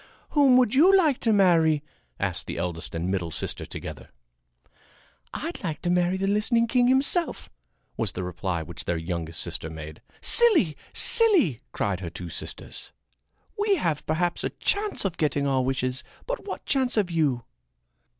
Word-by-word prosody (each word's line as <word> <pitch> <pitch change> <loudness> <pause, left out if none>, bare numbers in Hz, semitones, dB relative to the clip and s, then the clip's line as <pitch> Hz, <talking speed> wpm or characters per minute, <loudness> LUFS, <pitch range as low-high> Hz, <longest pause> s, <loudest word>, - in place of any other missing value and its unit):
"Whom 275 -4 +5
would 250 -4 +3
you 360 +8 +6
like 310 -8 +2
to 230 - +1
marry?" 165 -7 +3 0.4
asked - - -2
the - - -5
eldest 85 -1 -3
and 85 +1 -2
the 95 - -1
middle 90 -4 -2
sister 80 - -4
together. 70 -5 -8 1.2
"I'd 330 -4 -6
like 160 -5 -3
to 175 - 0
marry 180 +1 +1
the 195 - -2
listening 210 +4 +2
king 245 +1 +2
himself," 275 +7 +2 0.5
was - - -1
the 90 - -4
reply 90 -1 -3
which 80 0 -7
their 85 - -1
youngest 80 -1 -4
sister 80 - -2
made. 80 -1 -9 0.2
"Silly! 375 - +4 0.2
Silly!" 410 - +4
cried 100 -3 -2
her 90 -3 -5
two 85 +1 -8
sisters. - - -8 0.7
"We 415 -1 +3
have 160 - -1
perhaps 170 +2 -1
a - - -1
chance 410 - -1
of 180 -3 -2
getting 145 -2 0
our 135 -2 +1
wishes, 130 0 -2 0.2
but - - -5
what - - -6
chance 260 -3 0
have 200 -5 0
you?" 145 -8 0
165 Hz, 165 wpm, -25 LUFS, -, 1.2 s, you